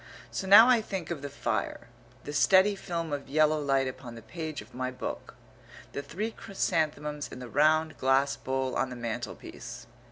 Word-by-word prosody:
So 190 - -4
now 205 +5 +10
I 250 -3 +5
think 190 -6 -5
of 160 -5 -3
the 145 - -5
fire; 120 -5 -2 0.4
the 145 - -6
steady 190 +7 +5
film 170 -5 -4
of 140 -2 -4
yellow 155 +1 +3
light 135 -2 +2
upon 130 -2 -7
the 115 - -11
page 155 +4 -5
of - - -12
my 130 0 -2
book; 130 - -6 0.6
the - - -4
three 210 +10 -4
chrysanthemums 150 -7 -2
in - - -10
the 125 -1 -7
round 155 +3 +2
glass 135 +1 +3
bowl 130 0 -2
on 130 - 0
the 125 - -7
mantelpiece. 120 -2 -6
145 Hz, 180 wpm, -29 LUFS, 130-170 Hz, 0.6 s, now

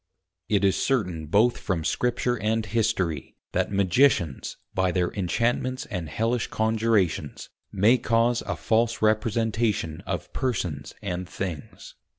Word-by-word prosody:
_It 100 -2 +2
is 95 -1 +4
certain 90 - 0
both 110 +9 +3
from 85 -5 -2
Scripture 120 +6 0
and 110 0 0
History, 100 - -1 0.2
that - - 0
Magicians 100 - +2 0.2
by 95 0 +1
their 90 -1 +1
Inchantments 120 +6 -1
and 90 -6 -3
Hellish 115 +7 0
Conjurations, 110 -9 0 0.2
may 110 +6 +4
cause 115 +1 +2
a - - -1
false 115 0 +1
Representation 110 -5 +1
of - - -4
Persons 90 - -2
and 90 -2 -4
Things. 90 -5 -6
105 Hz, 125 wpm, -26 LUFS, 90-115 Hz, 0.2 s, is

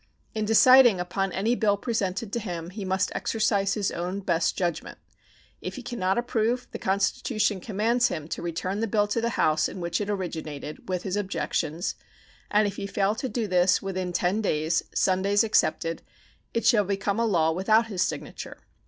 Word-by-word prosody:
In 215 -1 -1
deciding 240 -1 +7
upon 185 +2 -2
any 205 +6 0
bill 210 -4 +2
presented 205 -2 -2
to 235 - 0
him 175 -5 -5
he 200 +1 -6
must 190 0 0
exercise 200 -3 0
his 205 -3 -1
own 180 +3 -3
best 170 -3 0
judgment. 175 -3 -2 0.6
If - - -5
he 260 - -7
can 240 0 -6
not 185 +2 +1
approve, 240 +1 0
the - - -6
Constitution 200 +2 0
commands 230 +4 +1
him 155 -10 -5
to - - -4
return 180 +4 -3
the 225 - 0
bill 205 0 +2
to 230 +3 0
the 235 0 -2
House 155 0 +2
in - - -8
which 170 +2 -2
it 205 - -3
originated 160 -6 -5
with 180 -1 -2
his 190 0 -2
objections, 180 -4 -2 0.6
and 210 +1 +3
if 200 - -5
he 200 - -4
fail 200 +1 +1
to 255 +4 -4
do 235 -3 -2
this 180 -1 +3
within 185 -2 -3
ten 180 +4 0
days 160 -4 +1
(Sundays 195 +2 +2
excepted) 165 -6 +1 0.5
it 230 - -2
shall 220 -4 +5
become 200 +2 -1
a 230 - +2
law 165 -6 +2
without 215 +7 +3
his 200 -5 -3
signature. - - -4
195 Hz, 185 wpm, -26 LUFS, 180-220 Hz, 0.6 s, deciding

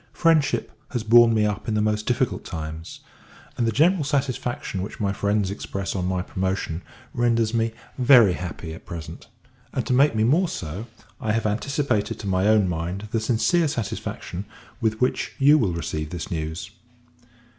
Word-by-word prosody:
Friendship 165 -3 +2 0.2
has 120 -3 -1
borne 120 +1 +7
me 110 -1 +3
up 105 0 -2
in 110 - 0
the - - +2
most 105 0 0
difficult 125 0 0
times; 80 -1 -7 0.5
and 120 - 0
the - - +2
general 160 - +3
satisfaction 130 -8 -2
which 100 - -6
my 100 -2 0
friends 100 -1 0
express, 100 -1 -4
on 90 -1 -1
my 90 -1 -1
promotion, 95 -3 -2 0.3
renders 115 -2 +1
me 115 0 +1 0.3
very 120 -7 +7
happy 85 -2 -6
at 80 - -12
present: 85 -3 -8 0.5
and, - - -1
to - - 0
make 135 0 +4
me 110 - +2
more 160 +10 +3
so, 90 +8 -5 0.3
I 110 -6 -1
have 115 0 0
anticipated 120 +1 0
to 100 - -6
my 95 +1 +2
own 105 -3 +4
mind 90 +5 -3
the 115 - +1
sincere 130 - +2
satisfaction 105 -6 -4 0.4
with 110 -1 0
which 125 - 0
you 145 +3 +6
will 95 -8 +1
receive 75 -2 -3
this 85 0 -6
news. 80 +1 -4
110 Hz, 170 wpm, -24 LUFS, 95-120 Hz, 0.5 s, borne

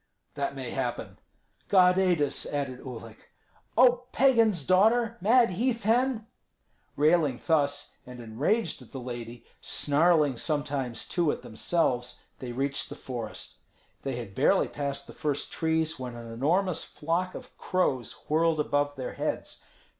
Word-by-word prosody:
"That - - -3
may - - -5
happen." - - -4 0.5
"God 180 -1 +5
aid 180 -5 +3
us!" 140 - -2
added 140 -3 -3
Uhlik. 115 -3 -10 0.5
"Oh, 250 0 +5
pagan's 230 - +3
daughter, 225 - +4
mad 230 +2 +5
heath 230 +4 -1
hen!" 235 +1 +2 0.7
Railing 150 -4 +3
thus, 145 -3 0
and 125 0 -11
enraged 140 - -1
at 125 - -16
the 135 - -5
lady, 120 -1 -7 0.2
snarling 150 -2 +2
sometimes 140 -4 -2
too 170 -4 +1
at - - -6
themselves, 125 0 -1 0.2
they 125 -2 -5
reached 140 +3 -1
the - - -7
forest. 120 -4 -6 0.4
They 135 -2 -3
had 115 -5 -7
barely - - +3
passed 140 -1 -4
the - - -11
first 145 -2 -2
trees 160 -1 0
when 125 -2 -6
an 115 -1 -8
enormous 165 +9 +1
flock 170 +4 -2
of - - -10
crows 135 - 0
whirled 160 +1 +2
above 145 -1 0
their 130 -2 -5
heads. - - -4
150 Hz, 140 wpm, -28 LUFS, 130-185 Hz, 0.7 s, God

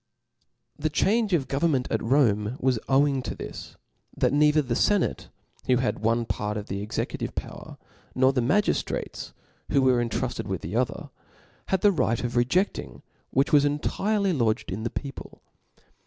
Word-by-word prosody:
The 155 +1 0
change 210 +8 +1
of 155 -7 +1
government 135 -2 +1
at 110 - 0
Rome 115 -3 +2
was 130 -3 +1
owing 135 0 +3
to - - -5
this, - - -8 0.4
that - - +2
neither 150 +1 +4
the 125 -3 -2
fenate 205 - +1 0.4
who 130 - +4
had 125 0 -1
one 115 +2 +1
part 105 -1 -3
of 105 - -5
the 100 +1 -3
executive 105 - -4
power, - - -7 0.4
nor 130 +1 +4
the 125 - +1
magiftrates 185 - -1 0.4
who 140 -2 +3
were 125 -2 +3
rntrufted 115 - -3
with - - -3
the 90 +7 -5
other, 125 -1 -2 0.6
had 190 -1 0
the 205 - +5
right 115 - 0
of 120 -1 -2
reje£ling, 130 +12 0 0.3
which 135 +4 +1
was 145 -1 +6
entirely 195 +7 0
lodged 115 - 0
in 100 +4 -4
the 115 - -2
people. 135 +2 -7
130 Hz, 160 wpm, -26 LUFS, 115-150 Hz, 0.6 s, was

